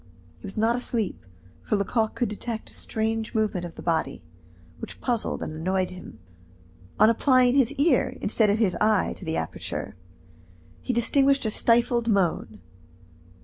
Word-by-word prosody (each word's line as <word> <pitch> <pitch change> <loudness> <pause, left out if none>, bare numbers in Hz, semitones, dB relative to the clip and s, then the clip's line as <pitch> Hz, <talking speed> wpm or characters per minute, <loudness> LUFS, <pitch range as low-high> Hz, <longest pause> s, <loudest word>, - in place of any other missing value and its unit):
He - - -9
was 195 - -9
not 225 +2 +2
asleep, 235 -5 -2 0.4
for 210 - -1
Lecoq 220 +2 0
could 240 - 0
detect 220 +2 -6
a - - -7
strange 220 0 -2
movement 210 -5 0
of 170 - -9
the - - -10
body, 160 - -1 0.6
which - - -9
puzzled 240 -3 -2
and - - -5
annoyed 185 +4 -1
him. 180 -10 -11 0.8
On 215 - +6
applying 250 +2 +4
his 270 -3 +3
ear 290 -1 +1
instead 215 0 +1
of 205 - +2
his 200 -6 +1
eye 215 -2 +2
to - - -13
the 160 0 -2
aperture, - - -5 0.9
he - - -2
distinguished 270 +3 +2
a 220 - +1
stifled 235 +1 +2
moan. 175 - 0
220 Hz, 155 wpm, -25 LUFS, 190-240 Hz, 0.9 s, On